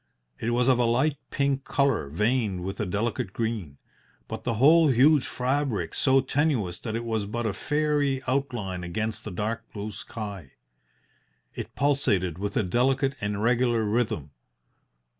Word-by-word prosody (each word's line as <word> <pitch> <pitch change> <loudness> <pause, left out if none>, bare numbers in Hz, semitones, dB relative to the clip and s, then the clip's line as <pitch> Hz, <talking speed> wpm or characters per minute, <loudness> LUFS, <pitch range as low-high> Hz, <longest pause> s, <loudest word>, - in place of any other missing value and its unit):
It 110 - -2
was 120 +1 +2
of 130 -2 +4
a 120 - +3
light 135 +6 +2
pink 140 -1 0
colour 140 - +1
veined 105 - 0
with 95 +2 -5
a 105 - -1
delicate 100 0 -2
green, 110 -11 -3 0.5
but - - -6
the 120 - 0
whole 155 +7 +6
huge 135 +1 +4
fabric 125 - -1
so 135 -1 +3
tenuous 130 - 0
that 110 -2 -4
it 115 +1 -3
was 110 -3 -1
but 120 +3 -3
a 110 - 0
fairy 150 +2 0
outline 120 -10 -2
against 110 +5 -3
the - - -5
dark 110 +5 -4
blue 105 0 -5
sky. 100 - -7 1.0
It - - -7
pulsated 105 - +1
with 100 0 -2
a - - +3
delicate 130 +7 +1
and 105 0 -2
regular 120 -1 +2
rhythm. 105 - -1
115 Hz, 155 wpm, -26 LUFS, 100-135 Hz, 1.0 s, whole